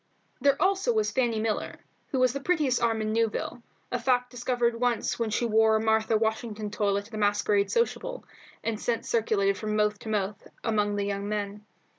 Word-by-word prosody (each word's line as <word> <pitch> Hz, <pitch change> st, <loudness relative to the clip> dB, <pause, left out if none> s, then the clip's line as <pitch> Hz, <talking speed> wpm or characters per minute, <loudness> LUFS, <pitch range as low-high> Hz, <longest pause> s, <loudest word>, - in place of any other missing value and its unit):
There 280 Hz, -1 st, +3 dB
also 390 Hz, +5 st, +2 dB
was 435 Hz, -1 st, +1 dB
Fanny 240 Hz, -4 st, +1 dB
Miller, 215 Hz, -1 st, -2 dB, 0.3 s
who 265 Hz, -, -1 dB
had 255 Hz, -, +4 dB
the 275 Hz, -, -4 dB
prettiest 290 Hz, -6 st, +1 dB
arm 225 Hz, -2 st, +1 dB
in 215 Hz, 0 st, -1 dB
Newville, 230 Hz, +1 st, -1 dB, 0.3 s
a 245 Hz, -, 0 dB
fact 250 Hz, 0 st, +1 dB
discovered 245 Hz, -1 st, 0 dB
once 245 Hz, -1 st, 0 dB
when 230 Hz, -1 st, 0 dB
she 215 Hz, +3 st, 0 dB
wore 220 Hz, -1 st, +4 dB
a -, -, +3 dB
Martha 220 Hz, 0 st, +2 dB
Washington 220 Hz, -1 st, -2 dB
toilet 200 Hz, 0 st, 0 dB
at -, -, -22 dB
a -, -, -4 dB
masquerade 205 Hz, -1 st, +2 dB
sociable, -, -, -1 dB, 0.4 s
and 225 Hz, -2 st, -2 dB
since 235 Hz, -1 st, -1 dB
circulated 200 Hz, -4 st, +1 dB
from 215 Hz, -1 st, -2 dB
mouth 210 Hz, -1 st, +1 dB
to 220 Hz, -, -8 dB
mouth 205 Hz, -1 st, -2 dB, 0.2 s
among 210 Hz, -2 st, +1 dB
the 200 Hz, 0 st, -1 dB
young 200 Hz, 0 st, -3 dB
men. 210 Hz, 0 st, -3 dB
220 Hz, 190 wpm, -27 LUFS, 210-245 Hz, 0.4 s, had